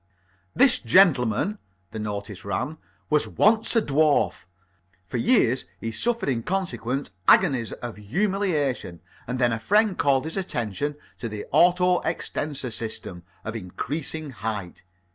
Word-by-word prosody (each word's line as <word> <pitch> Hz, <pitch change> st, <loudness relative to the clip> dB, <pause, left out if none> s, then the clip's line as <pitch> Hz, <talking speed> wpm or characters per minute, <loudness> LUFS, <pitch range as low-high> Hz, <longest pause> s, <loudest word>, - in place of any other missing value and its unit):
"This 270 Hz, -2 st, +5 dB
gentleman," 175 Hz, -, +3 dB, 0.3 s
the 110 Hz, -, -6 dB
notice 100 Hz, -2 st, -5 dB
ran, 130 Hz, +11 st, -3 dB, 0.3 s
"was 150 Hz, -1 st, +3 dB
once 220 Hz, +3 st, +2 dB
a 225 Hz, -, +4 dB
dwarf. 150 Hz, -, +2 dB, 0.6 s
For 90 Hz, -, -4 dB
years 130 Hz, -, +3 dB
he 115 Hz, -, -4 dB
suffered 230 Hz, -, 0 dB
in 125 Hz, -4 st, 0 dB
consequence 135 Hz, -, -2 dB, 0.2 s
agonies 135 Hz, -, +4 dB
of 120 Hz, -3 st, -7 dB
humiliation, 150 Hz, -, -1 dB, 0.3 s
and 125 Hz, +2 st, -2 dB
then 120 Hz, -2 st, +2 dB
a 115 Hz, -, -2 dB
friend 210 Hz, -, +2 dB
called 135 Hz, -3 st, +2 dB
his 160 Hz, +4 st, -4 dB
attention 145 Hz, -, -2 dB, 0.2 s
to 115 Hz, -, -4 dB
the 105 Hz, -1 st, -6 dB
Auto 180 Hz, +1 st, +4 dB
extensor 145 Hz, -5 st, -3 dB
System 110 Hz, -5 st, -5 dB, 0.2 s
of 110 Hz, 0 st, -4 dB
increasing 140 Hz, -, -4 dB
height. 105 Hz, -4 st, -5 dB
135 Hz, 130 wpm, -25 LUFS, 110-180 Hz, 0.6 s, This